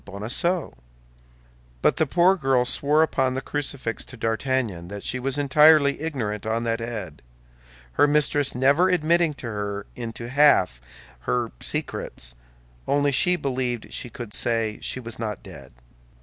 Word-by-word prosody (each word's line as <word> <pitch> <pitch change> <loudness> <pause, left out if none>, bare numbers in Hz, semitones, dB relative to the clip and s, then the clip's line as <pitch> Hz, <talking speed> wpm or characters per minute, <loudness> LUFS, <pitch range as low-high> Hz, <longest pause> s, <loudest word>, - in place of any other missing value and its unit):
Bonacieux; 120 - -2 1.1
but - - +3
the 160 - +2
poor 180 +6 +4
girl 135 -7 +2
swore 145 +5 +3
upon 130 -4 0
the - - -1
crucifix 140 -5 -3
to 125 - -11
D'Artagnan 115 -5 -1
that 100 +1 -7
she 130 - -2
was 135 +2 -2
entirely 145 +1 +5
ignorant 115 -10 -3
on 115 +1 -1
that 115 0 -1
head, 105 -9 -6 0.7
her 145 - +4
mistress 145 -2 +2
never 140 +8 +4
admitting 170 -2 +2
her 105 -3 -4
into 115 0 -6
half 135 - +4 0.5
her 120 -2 0
secrets—only - - -4
she 180 +7 +3
believed 125 -6 -2
she 120 - -4
could 115 -3 -8
say 115 -2 0
she - - -3
was 115 -2 -8
not 110 -3 -4
dead. 70 -1 -12
125 Hz, 135 wpm, -24 LUFS, 110-145 Hz, 1.1 s, entirely